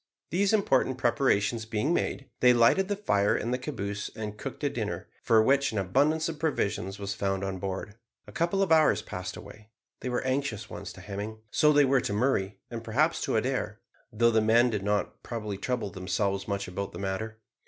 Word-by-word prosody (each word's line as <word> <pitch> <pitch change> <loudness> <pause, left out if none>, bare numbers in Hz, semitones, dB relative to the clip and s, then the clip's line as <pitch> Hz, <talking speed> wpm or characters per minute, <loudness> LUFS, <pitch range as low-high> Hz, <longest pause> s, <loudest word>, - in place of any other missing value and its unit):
These 195 +4 +2
important 135 - +2
preparations 115 -3 +1
being 115 +9 0
made, 135 -5 -1
they 125 0 +6
lighted 120 +11 +4
the 205 - 0
fire 105 - +2
in 115 - -2
the 125 - +1
caboose 105 -7 -4
and 105 -2 -5
cooked - - -7
a - - +2
dinner, - - -4
for 110 -1 +4
which 140 +3 +3
an 110 - -4
abundance 145 - +2
of 160 -2 -5
provisions 100 - -1
was 100 0 -3
found 95 -1 -1
on 95 -1 -3
board. 95 +1 -4 0.3
A - - -12
couple 175 +4 +1
of 190 - -2
hours 155 -10 +5
passed 90 0 -6
away. 105 +2 -12 0.3
They 130 - -4
were 125 - -1
anxious 130 -5 -2
ones - - -6
to - - -12
Hemming 105 +2 -5
so 150 - +4
they 145 -1 +5
were 135 -1 +3
to - - -2
Murray, 105 -4 0
and 115 -1 -5
perhaps 145 +9 +1
to - - -1
Adair, 115 -2 -1 0.3
though 115 +1 +3
the 110 -1 +3
men 115 +3 +4
did 105 -3 -1
not 105 +1 -1
probably 105 -4 -5
trouble 120 -3 -2
themselves 100 +1 -1
much 100 -1 -2
about 95 +2 -5
the - - -7
matter. 100 +3 -3
110 Hz, 200 wpm, -28 LUFS, 100-135 Hz, 0.3 s, they